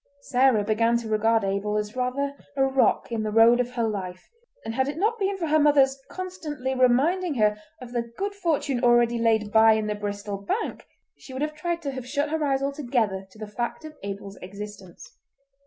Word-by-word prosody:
Sarah 255 -5 +3
began 230 +3 +2
to 235 -1 -5
regard 220 +1 +2
Abel 200 +2 -1
as 210 +2 -3
rather 260 +3 -1 0.2
a 270 - +4
rock 265 -2 +2
in 230 -2 -1
the 215 - -2
road 225 +3 +6
of 250 0 -1
her 235 -1 -1
life, 185 -4 -6 0.3
and 225 - -3
had 265 +3 +1
it 290 +2 -4
not 440 +6 +1
been 395 0 0
for 345 - -2
her 310 0 +3
mother's 285 -3 +4
constantly 315 -8 -4
reminding 280 +7 +2
her 210 -3 +3 0.2
of 250 -2 -10
the 235 -1 -3
good 400 +1 -2
fortune 300 -9 -1
already 240 -1 +4
laid 220 -2 +2
by 220 0 +6
in 220 -1 0
the 210 - -1
Bristol 205 -1 -4
Bank 200 - -3 0.3
she 260 - -12
would 260 +3 -2
have 305 0 -2
tried 335 +2 -3
to 280 - -2
have 260 -2 -7
shut 290 +3 -1
her 320 -1 0
eyes 275 -1 +1
altogether 240 -9 -1
to 190 - -19
the 215 - -6
fact 240 +8 -4
of 310 0 -9
Abel's 200 0 -7
existence. 200 - -10
240 Hz, 205 wpm, -25 LUFS, 215-285 Hz, 0.3 s, road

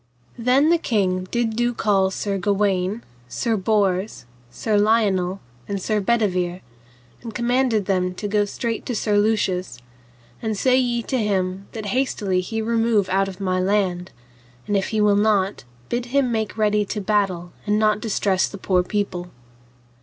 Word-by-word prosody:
Then 260 +7 +3
the 340 - +4
king 185 - 0
did 235 -2 -1
do 240 +1 0
call 195 -4 +2
Sir 195 +1 -2
Gawaine, 200 +1 0 0.3
Sir 230 - -1
Bors, 195 - 0 0.2
Sir 215 - -2
Lionel, 205 -3 +2 0.3
and 200 -1 -2
Sir 215 +3 0
Bedivere, 185 -5 0 0.6
and 230 -3 -8
commanded 240 -3 +1
them 180 -2 0
to 205 - -4
go 205 0 +2
straight 230 +2 -3
to 245 - -2
Sir 210 -1 +1
Lucius, 190 - 0 0.6
and 220 -2 -2
say 255 +4 +3
ye 240 -2 +1
to 260 - -1
him 195 -2 -1
that 220 -2 -6
hastily 205 -5 0
he 220 +4 -3
remove 225 -3 +1
out 195 +1 +2
of 190 -2 -8
my 185 -2 0
land; 185 -2 0 0.5
and 205 - -1
if 195 -1 +1
he 220 - -1
will 210 -1 +4
not, 205 - +1 0.2
bid 240 0 -2
him 260 -1 +1
make 220 -2 -1
him - - -12
ready 210 0 +3
to 210 +1 -4
battle 195 -4 0 0.2
and 210 0 +2
not 215 -1 +2
distress 200 -3 +1
the 200 - -8
poor 185 -1 +1
people. 180 -2 -3
205 Hz, 165 wpm, -22 LUFS, 190-225 Hz, 0.6 s, the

